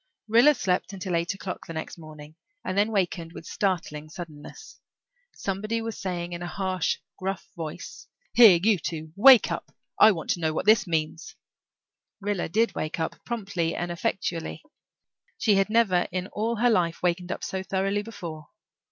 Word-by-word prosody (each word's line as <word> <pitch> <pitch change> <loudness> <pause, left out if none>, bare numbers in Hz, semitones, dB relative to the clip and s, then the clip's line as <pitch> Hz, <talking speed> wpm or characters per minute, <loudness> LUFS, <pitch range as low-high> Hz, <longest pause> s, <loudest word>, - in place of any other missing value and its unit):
Rilla 235 +7 +6
slept 185 -3 -1
until 185 -2 -3
eight 170 +4 0
o'clock 190 -1 -7
the 165 - -6
next 160 +2 -6
morning 155 -1 -11 0.3
and 185 - -2
then 205 +2 +2
wakened 175 -4 -1
with - - -10
startling 165 -6 -2
suddenness. 160 - -10 0.6
Somebody 215 +4 -2
was 225 -1 -4
saying 175 -2 -3
in 170 - -5
a 175 - -4
harsh, 185 -2 -1 0.2
gruff 195 +1 -3
voice, 160 -3 -7 0.3
"Here, 215 -8 +8
you 210 -3 +4
two, 160 -1 -5
wake 250 +3 +7
up. - - -5 0.3
I 220 - +9
want 165 -6 -3
to - - -1
know 160 -2 0
what - - -2
this 215 -1 +5
means." 160 0 -2 0.8
Rilla 205 -4 -2
did 225 +6 +2
wake 155 +2 -4
up, 160 - -4
promptly 195 -8 -2
and 175 0 -3
effectually. 170 -1 -3 0.7
She 215 - +3
had 195 +1 +2
never 210 -6 +3
in 185 0 -2
all 225 +3 -1
her 240 +2 +3
life 170 -5 +1
wakened 180 0 0
up - - -5
so 190 - -3
thoroughly 195 +2 -1
before. 170 -8 -8
185 Hz, 170 wpm, -26 LUFS, 170-205 Hz, 0.8 s, I